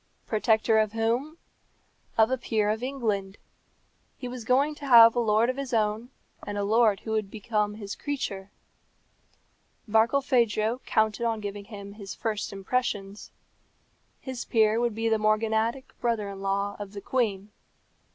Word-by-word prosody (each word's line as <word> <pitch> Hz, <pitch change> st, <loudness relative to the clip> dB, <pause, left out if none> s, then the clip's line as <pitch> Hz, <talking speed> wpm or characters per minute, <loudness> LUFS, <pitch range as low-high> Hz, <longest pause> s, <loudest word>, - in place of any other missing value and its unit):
Protector 220 Hz, 0 st, +2 dB
of 215 Hz, -1 st, 0 dB
whom? 235 Hz, +8 st, -1 dB, 0.8 s
Of 225 Hz, +2 st, +4 dB
a 260 Hz, -, +1 dB
peer 215 Hz, -3 st, 0 dB
of 220 Hz, +1 st, -3 dB
England. 215 Hz, -7 st, -2 dB, 0.8 s
He 250 Hz, -, -6 dB
was 245 Hz, -1 st, -7 dB
going 275 Hz, +5 st, +2 dB
to 285 Hz, -, -5 dB
have 230 Hz, -3 st, +8 dB
a -, -, +2 dB
lord 220 Hz, 0 st, +3 dB
of 255 Hz, +1 st, -2 dB
his 270 Hz, -3 st, -3 dB
own, 215 Hz, +2 st, 0 dB, 0.3 s
and 205 Hz, 0 st, -5 dB
a 205 Hz, -, 0 dB
lord 215 Hz, -1 st, +3 dB
who 220 Hz, -, -6 dB
would 215 Hz, -2 st, -1 dB
be 220 Hz, -, -8 dB
his 210 Hz, -1 st, -2 dB
creature. 205 Hz, -9 st, -4 dB, 1.4 s
Barkilphedro 235 Hz, 0 st, +2 dB
counted 220 Hz, +2 st, +1 dB
on 225 Hz, -1 st, -1 dB
giving 205 Hz, -1 st, -6 dB
him 200 Hz, -2 st, -9 dB
his 200 Hz, -2 st, -8 dB
first 215 Hz, -2 st, -3 dB
impressions. 200 Hz, -1 st, -3 dB, 0.9 s
His 260 Hz, -2 st, -6 dB
peer 220 Hz, -1 st, +2 dB
would 240 Hz, -2 st, 0 dB
be 225 Hz, +1 st, -1 dB
the 220 Hz, -1 st, +2 dB
morganatic 220 Hz, +3 st, 0 dB
brother 230 Hz, -4 st, -1 dB
in 195 Hz, -1 st, -8 dB
law 200 Hz, +1 st, -1 dB
of 205 Hz, -1 st, -7 dB
the 200 Hz, -, -7 dB
queen. 210 Hz, -4 st, -1 dB
220 Hz, 150 wpm, -27 LUFS, 205-240 Hz, 1.4 s, have